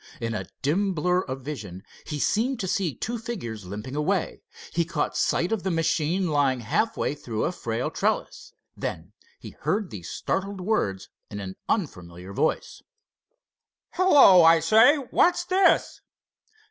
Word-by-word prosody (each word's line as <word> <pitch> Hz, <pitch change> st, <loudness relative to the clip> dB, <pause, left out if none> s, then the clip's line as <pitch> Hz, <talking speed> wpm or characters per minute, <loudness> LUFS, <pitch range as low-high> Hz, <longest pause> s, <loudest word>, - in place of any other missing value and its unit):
In 115 Hz, -1 st, -3 dB
a 105 Hz, -, -4 dB, 0.2 s
dim 190 Hz, +7 st, +1 dB
blur 180 Hz, +3 st, +1 dB
of 130 Hz, -5 st, -6 dB
vision 105 Hz, -10 st, -7 dB, 0.2 s
he 150 Hz, -, -4 dB
seemed 230 Hz, -, 0 dB
to 190 Hz, -, -3 dB
see 175 Hz, -5 st, -1 dB
two 235 Hz, +1 st, -4 dB
figures 120 Hz, -, -6 dB
limping 105 Hz, +8 st, -7 dB
away. 175 Hz, +5 st, -1 dB, 0.3 s
He 170 Hz, -, +2 dB
caught 165 Hz, -3 st, -2 dB
sight 175 Hz, -, +1 dB
of 220 Hz, -3 st, 0 dB
the 190 Hz, -, -2 dB
machine 165 Hz, +2 st, 0 dB
lying 135 Hz, -4 st, +1 dB
half 215 Hz, -, 0 dB
way -, -, -1 dB
through 120 Hz, -7 st, -4 dB
a -, -, 0 dB
frail 120 Hz, -8 st, -3 dB
trellis. -, -, -2 dB, 0.2 s
Then 85 Hz, +6 st, -6 dB, 0.2 s
he -, -, -10 dB
heard 205 Hz, -5 st, -2 dB
these 90 Hz, -6 st, -8 dB
startled 195 Hz, +1 st, -3 dB
words 180 Hz, -, -1 dB, 0.2 s
in 105 Hz, -, -6 dB
an 95 Hz, -1 st, -6 dB
unfamiliar 90 Hz, -, -3 dB
voice: 155 Hz, -, -1 dB, 1.1 s
"Hello! 290 Hz, -, +7 dB
I 165 Hz, 0 st, +7 dB
say, 220 Hz, -, +6 dB
what's 345 Hz, +6 st, +1 dB
this?" 375 Hz, +1 st, +2 dB
165 Hz, 150 wpm, -25 LUFS, -, 1.1 s, Hello